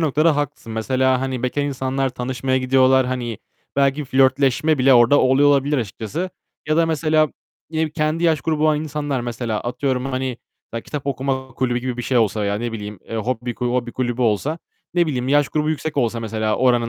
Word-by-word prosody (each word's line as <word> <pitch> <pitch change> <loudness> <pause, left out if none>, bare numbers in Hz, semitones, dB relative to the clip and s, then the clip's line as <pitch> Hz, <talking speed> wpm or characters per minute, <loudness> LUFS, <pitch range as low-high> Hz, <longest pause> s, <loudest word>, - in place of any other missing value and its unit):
noktada 155 0 +2
haklısın. 145 -5 -4
Mesela, 130 +3 +1
hani 130 -2 -3
bekâr 130 +3 0
insanlar 135 -1 -1
tanışmaya 130 +1 -1
gidiyorlar. 130 0 +4
Hani 120 -4 -3 0.4
belki 140 +1 +2
flörtleşme 135 +3 +2
bile 130 +1 +5
orada 120 +4 +6
oluyor 135 +3 +4
olabilir 145 +1 +2
açıkçası. 115 - -4 0.4
Ya 155 - +2
da 165 0 +4
mesela, 155 -1 +2 0.4
yine 160 -1 -1
kendi 155 +2 -1
yaş 160 -3 +3
grubu 155 +1 -1
olan 155 -1 +3
insanlar 145 -3 -2
mesela, 120 -2 -3
atıyorum 125 +1 -2
hani 130 -2 -2 0.5
kitap 145 -2 -6
okuma 135 -1 -2
kulübü 125 -1 0
gibi 125 0 -4
bir 125 - -4
şey 125 0 +1
olsa 110 -1 +1
veya 100 0 0
ne 115 +2 -3
bileyim, 105 -2 -6
eee, 115 - -4
hob 115 +4 -1 0.2
hobi 125 -1 -1
kulübü 125 -1 -1
olsa, 120 +8 0 0.4
ne 175 -1 +3
bileyim, 130 -4 -2
yaş 145 0 +3
grubu 155 0 0
yüksek 155 0 -3
olsa 120 -3 0
mesela 110 -1 -1
oranın 120 -2 +2
130 Hz, 180 wpm, -21 LUFS, 120-145 Hz, 0.5 s, orada